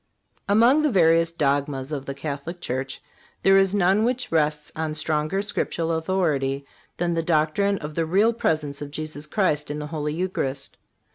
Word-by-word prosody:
Among 235 +8 +5
the 305 - +2
various 165 -5 +4
dogmas 140 -3 -1
of 140 -3 -4
the 140 - -4
Catholic 150 +4 -5
Church 135 -2 -4 0.4
there 195 - +6
is 195 +1 +2
none 195 +2 +3
which 250 +1 -1
rests 150 -2 +1
on 155 -1 -2
stronger 155 +5 0
Scriptural 170 -5 -2
authority 155 -5 0 0.3
than 175 0 0
the 165 - 0
doctrine 165 +5 +1
of 150 -2 -7
the 165 +1 -1
Real 205 +7 +3
Presence 150 -9 -1
of 145 - -5
Jesus 155 0 -5
Christ 150 -4 0
in 150 - -3
the 150 - -4
Holy 150 -1 -2
Eucharist. 140 -7 -3
160 Hz, 165 wpm, -24 LUFS, 150-185 Hz, 0.4 s, there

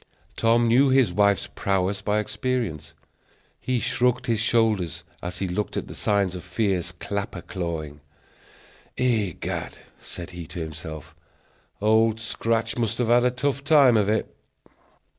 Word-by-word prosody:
Tom 115 +1 +3
knew 130 +4 +5
his 130 -8 +4
wife's 100 0 +3
prowess 95 0 -1
by 105 +1 0
experience. 105 - -2 0.6
He 130 -1 -1
shrugged 125 +1 +1
his 115 -2 +1
shoulders 110 -7 +1 0.2
as 90 +1 -5
he 95 - -2
looked 90 +4 -2
at - - -3
the - - -8
signs 100 -3 +1
of 90 - -7
fierce 90 -2 -1
clapper 100 +4 -5
clawing. 80 -7 -5 1.0
"Egad," 110 -8 -1 0.2
said 90 +1 -9
he 85 -2 -8
to 85 - -7
himself, 80 -1 -7 0.7
"Old 110 +1 +3
Scratch 115 0 -1
must 115 -1 0
have 120 -2 0
had 120 +1 +5
a - - +5
tough 135 +2 -2
time 140 -5 +6
of 105 -2 +3
it!" 110 - -1
105 Hz, 140 wpm, -25 LUFS, 90-115 Hz, 1.0 s, time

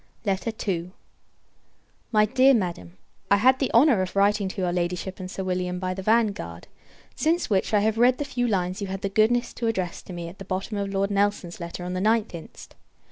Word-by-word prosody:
II. 195 -3 -2 1.2
My 215 -2 +5
Dear 260 +4 +5
Madam, 170 - -3 0.3
I 200 - +6
had 255 +6 +4
the 270 - 0
honour 240 -4 +5
of 185 +1 -4
writing 200 0 +3
to 190 - -6
your 180 -1 0
Ladyship 180 +2 -2
and 185 -1 -6
Sir 190 - -5
William, 180 -1 -2
by 185 0 -2
the 190 - -6
Vanguard; 220 0 0 0.5
since 330 -3 0
which, 190 -2 +1
I 210 -2 +3
have 220 +1 +1
read 250 +1 +5
the 290 - -3
few 245 -3 -1
lines 185 -3 -1
you 200 - -2
had 190 0 -5
the 195 - 0
goodness 220 +4 +2
to 235 - -3
address 185 -6 -2
to 185 - -10
me 170 -1 -5
at 175 +3 -11
the - - -6
bottom 190 +3 -3
of 200 -1 -2
Lord 195 +1 0
Nelson's 200 -3 0
letter 170 +1 -6
of 180 - -4
the 185 - -2
9th 220 +1 +1
inst. 165 -2 -10
200 Hz, 210 wpm, -25 LUFS, 185-220 Hz, 1.2 s, I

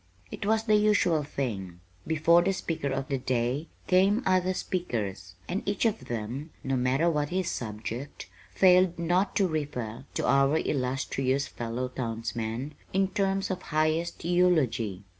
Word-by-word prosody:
It 200 - -5
was 220 +1 +2
the 215 -1 +2
usual 210 -7 +3
thing. 100 -11 -4 0.3
Before 160 +2 +4
the 195 +3 +1
Speaker 165 -6 -3
of 135 +1 -2
the 135 -2 -1
Day 125 +4 -1 0.2
came 195 +6 +3
other 185 0 +2
speakers, 100 - -3
and 185 +3 -2
each 205 +3 0
of 220 -1 0
them, 120 +7 -4
no 135 0 0
matter 130 +6 +2
what 150 -3 +1
his 185 0 -1
subject, 115 +4 -5 0.2
failed 180 -1 +5
not 175 +4 +1
to 195 - +3
refer 135 -7 -4
to - - 0
"our 140 +2 +4
illustrious 135 -1 0
fellow 120 0 -4
townsman" 115 +2 -4 0.2
in 190 0 +2
terms 195 0 0
of 185 -1 -3
highest 155 +2 -1
eulogy. 135 - +2
150 Hz, 145 wpm, -28 LUFS, 125-180 Hz, 0.3 s, failed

